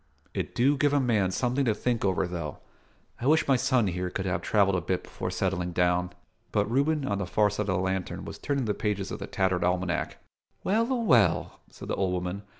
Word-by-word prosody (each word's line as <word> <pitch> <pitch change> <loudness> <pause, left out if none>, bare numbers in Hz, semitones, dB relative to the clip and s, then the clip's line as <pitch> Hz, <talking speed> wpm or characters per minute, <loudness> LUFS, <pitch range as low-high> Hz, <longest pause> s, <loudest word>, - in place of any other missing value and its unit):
It - - -4
do 140 +4 +3
give 145 +1 +2
a 145 - +4
man 110 -7 +2
something 125 +7 0
to 110 -3 +2
think 120 +1 -1
over, 95 -1 +1
though. 85 -4 -5 0.6
I 120 - -2
wish 160 +2 +4
my 135 - +5
son 125 -2 +2
here 90 -1 -2
could 95 +1 -4
have 90 - -1
travelled 100 -2 +3
a 90 - 0
bit 90 +1 -2
before - - -5
settlin' 90 -1 -1
down." 90 +1 +1 0.4
But 105 - +2
Reuben, 140 +5 +1
on 100 -4 -1
the 100 - -3
far 105 +2 +2
side 105 0 -2
of 95 - +2
the - - +1
lantern, 95 0 -2
was - - -8
turning 140 -3 -1
the 105 - 0
pages 105 -2 -2
of - - -5
the - - -5
tattered 95 -2 0
almanack. 90 -1 -1 0.5
"Well 230 +6 +1
a - - +2
well!" 120 - +2
said - - -11
the - - -1
old 95 -2 0
woman. 90 +2 -3
100 Hz, 225 wpm, -28 LUFS, 90-125 Hz, 0.6 s, my